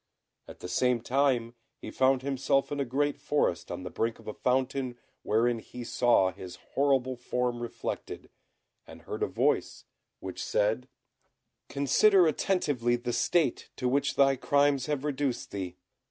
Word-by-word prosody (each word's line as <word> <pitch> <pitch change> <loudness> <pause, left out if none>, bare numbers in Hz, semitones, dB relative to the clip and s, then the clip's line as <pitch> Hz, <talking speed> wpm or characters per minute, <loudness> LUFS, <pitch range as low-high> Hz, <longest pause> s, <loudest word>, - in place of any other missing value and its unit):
At - - -12
the - - -5
same 125 +7 +1
time 125 -2 +1 0.2
he - - -8
found 130 0 +2
himself 135 0 0
in 145 - -2
a 140 - 0
great 145 +3 -1
forest, 145 - 0
on 90 - -5
the 90 - -6
brink 115 0 -1
of - - -17
a 110 - -4
fountain 130 0 -1 0.2
wherein 115 +2 +1
he 125 +2 -9
saw 120 -6 +3
his 90 -1 -9 0.2
horrible 135 -2 +2
form 125 0 -2
reflected, 120 - -6 0.6
and - - -13
heard 430 -1 -6
a 430 - +2
voice, - - 0 0.3
which - - -6
said, - - 0 0.8
"Consider 180 +7 +4
attentively 145 -8 +1
the 120 0 -3
state 170 +5 +1
to 125 - -2
which 140 +2 +1
thy 135 -1 +4
crimes 140 0 +2
have 145 -2 -2
reduced 140 -3 -2
thee. 95 -3 -5
130 Hz, 155 wpm, -29 LUFS, 120-145 Hz, 0.8 s, Consider